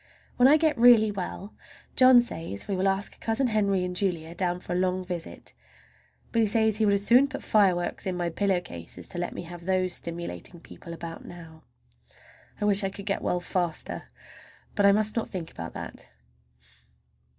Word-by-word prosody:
When 250 - +6
I 295 +3 +6
get 310 -5 +1
really 230 -3 +6
well 200 +1 -6 0.4
John 255 -1 +7
says 165 - -5
we 200 - -1
will 190 +1 0
ask 195 +1 -2
Cousin 225 +4 0
Henry 200 -5 +1
and 180 0 -5
Julia 170 -4 -2
down 175 0 -1
for 180 - -6
a - - -1
long 185 0 0
visit; 175 -2 -6 0.8
but 230 - 0
he 225 - +3
says 220 0 +2
he 220 - +2
would 200 - +3
as 200 0 +1
soon 250 +5 +6
put 275 0 -7
fire 200 -4 +3
works 175 +2 -4
in 185 -1 -2
my 175 -1 -2
pillow 195 +1 +1
case 85 - -9
as 90 - -9
to - - -6
let 175 - -4
me - - -5
have 170 0 -10
those 185 -1 0
stimulating 170 - -6
people 170 - -12
about 170 0 -8
now. 165 -2 -12 0.9
I 210 - -1
wish 205 -1 +7
I 195 - 0
could 200 0 -10
get 200 -2 -1
well 180 - -1
faster. 175 -2 -3 0.7
But 205 -2 +3
I - - +7
must 215 +1 +2
not 230 - -2
think 175 -4 -6
about 85 0 -8
that. - - -8
190 Hz, 195 wpm, -26 LUFS, 175-215 Hz, 0.9 s, John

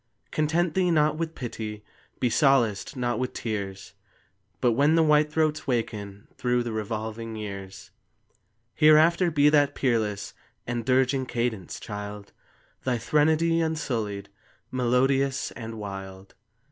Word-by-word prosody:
Content 160 +2 +1
thee, 185 0 +2
not 155 -2 +3
with 165 -1 -3
pity; 110 -4 -6 0.3
Be 125 - +2
solaced, 120 -3 +2
not 120 -1 -1
with 130 0 -2
tears; 100 -4 -5 0.7
But 120 - +3
when 145 +7 +3
the 165 - +5
whitethroats 150 0 +2
waken 105 -5 -3
Through 125 -1 +1
the 120 - -4
revolving 110 +1 -4
years, 100 -3 -7 0.8
Hereafter 160 +4 +5
be 145 -2 +3
that 145 -1 +3
peerless 110 -5 -1 0.3
And 120 -1 -3
dirging 130 0 +2
cadence, 115 -7 -3
child, 105 -1 -7 0.5
Thy 125 -2 0
threnody 160 +6 +2
unsullied, 115 -11 -2 0.4
Melodious, 130 +2 +1
and 115 -1 -7
wild. 95 -2 -8
125 Hz, 120 wpm, -26 LUFS, 105-150 Hz, 0.8 s, the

